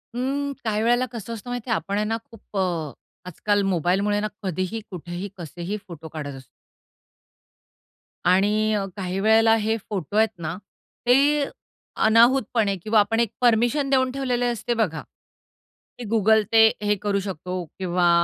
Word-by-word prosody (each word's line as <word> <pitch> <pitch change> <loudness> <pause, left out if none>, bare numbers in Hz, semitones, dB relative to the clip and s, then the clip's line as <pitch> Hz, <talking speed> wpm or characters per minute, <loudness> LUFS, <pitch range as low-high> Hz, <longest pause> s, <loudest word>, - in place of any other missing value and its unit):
हं, 275 +3 -1
काही 215 -2 0
वेळेला 240 +2 +3
कसं 230 -1 -6
असतं 230 +2 -8
माहित 245 0 -3
आहे? 225 - +2
आपण 200 -1 -3
आहे 210 - +1
ना, 225 +1 -1
खूप 215 -2 -10
अ, 170 -6 -1 0.3
आजकाल 205 +4 0
मोबाईलमुळे 195 +3 +1
ना 210 - -1 0.2
कधीही, 185 +4 -2
कुठेही, 175 +2 -6
कसेही 175 +4 -5
फोटो 165 -2 -9
काढत 145 -3 -5
असतो. 130 0 -12 1.9
आणि 210 +3 +2
अ, 205 -2 0
काही 190 -1 -3
वेळेला 225 +2 +5
हे 220 0 0
फोटो 200 -3 -4
आहेत 220 0 +4
ना, 165 +1 -4 0.5
ते 280 +4 +4 0.6
अनाहूतपणे 230 -2 +4
किंवा 215 0 +3
आपण 215 +2 +2
एक 235 -2 +1
परमिशन 240 +4 +3
देऊन 260 -1 +2
ठेवलेले 250 -2 -1
असते 240 0 -1
बघा, 185 -10 -1 1.0
की 245 - -7
गुगल 220 0 +4
ते 225 -1 +7 0.2
हे 210 0 +2
करू 205 -1 0
शकतो 185 -1 -4 0.2
किंवा 180 -1 +2
210 Hz, 150 wpm, -24 LUFS, 185-230 Hz, 1.9 s, ते